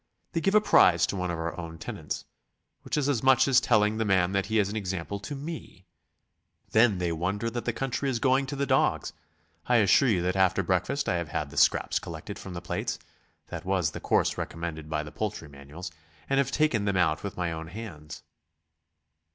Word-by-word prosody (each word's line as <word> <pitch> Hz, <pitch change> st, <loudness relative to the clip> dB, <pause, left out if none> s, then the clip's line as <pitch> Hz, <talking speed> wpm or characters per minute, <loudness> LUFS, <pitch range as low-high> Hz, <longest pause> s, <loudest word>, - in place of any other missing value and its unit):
They 165 Hz, -, -1 dB
give 195 Hz, +6 st, +2 dB
a 215 Hz, -, +7 dB
prize 85 Hz, -, +5 dB
to -, -, -4 dB
one 90 Hz, -1 st, -2 dB
of 85 Hz, -, -2 dB
our 80 Hz, 0 st, -3 dB
own 85 Hz, -1 st, -7 dB
tenants... -, -, -6 dB, 0.6 s
which -, -, -3 dB
is 145 Hz, -2 st, +1 dB
as 135 Hz, -6 st, +1 dB
much 130 Hz, 0 st, +5 dB
as 135 Hz, -3 st, +5 dB
telling 110 Hz, -2 st, +3 dB
the 110 Hz, -, +1 dB
man 95 Hz, -3 st, +2 dB
that 95 Hz, -1 st, 0 dB
he 110 Hz, -, 0 dB
is 105 Hz, -2 st, +3 dB
an 105 Hz, -, -5 dB
example 95 Hz, -1 st, -3 dB
to 145 Hz, +8 st, -6 dB
me. 140 Hz, -, -8 dB, 0.9 s
Then 110 Hz, -3 st, +4 dB
they 90 Hz, -1 st, -1 dB
wonder 95 Hz, +7 st, -2 dB
that 120 Hz, 0 st, -4 dB
the 120 Hz, -, +1 dB
country 135 Hz, +3 st, -2 dB
is 125 Hz, -, 0 dB
going 135 Hz, +2 st, +2 dB
to 140 Hz, -, -4 dB
the 140 Hz, 0 st, 0 dB
dogs. 80 Hz, -, +1 dB, 0.5 s
I 125 Hz, -, +3 dB
assure 110 Hz, +4 st, +5 dB
you 90 Hz, -6 st, +2 dB
that 90 Hz, +1 st, 0 dB
after 95 Hz, 0 st, +3 dB
breakfast 95 Hz, -, 0 dB
I 90 Hz, -, +1 dB
have 85 Hz, -2 st, -4 dB
had -, -, -3 dB
the -, -, -11 dB
scraps -, -, +3 dB
collected -, -, -8 dB
from 95 Hz, -2 st, -8 dB
the 85 Hz, -, -5 dB
plates -, -, -3 dB, 0.5 s
that -, -, -6 dB
was 90 Hz, -5 st, 0 dB
the -, -, -7 dB
course -, -, +1 dB
recommended 80 Hz, -2 st, -5 dB
by 75 Hz, -1 st, -1 dB
the 75 Hz, -, -9 dB
poultry 105 Hz, -7 st, -4 dB
manuals 70 Hz, +5 st, -9 dB, 0.4 s
and 135 Hz, 0 st, +2 dB
have 135 Hz, -2 st, +2 dB
taken 135 Hz, -9 st, +1 dB
them 100 Hz, -2 st, +1 dB
out 80 Hz, -3 st, +2 dB
with 100 Hz, -, -6 dB
my 90 Hz, -2 st, -1 dB
own 80 Hz, 0 st, -6 dB
hands." 85 Hz, -6 st, -9 dB
100 Hz, 215 wpm, -28 LUFS, 85-120 Hz, 0.9 s, a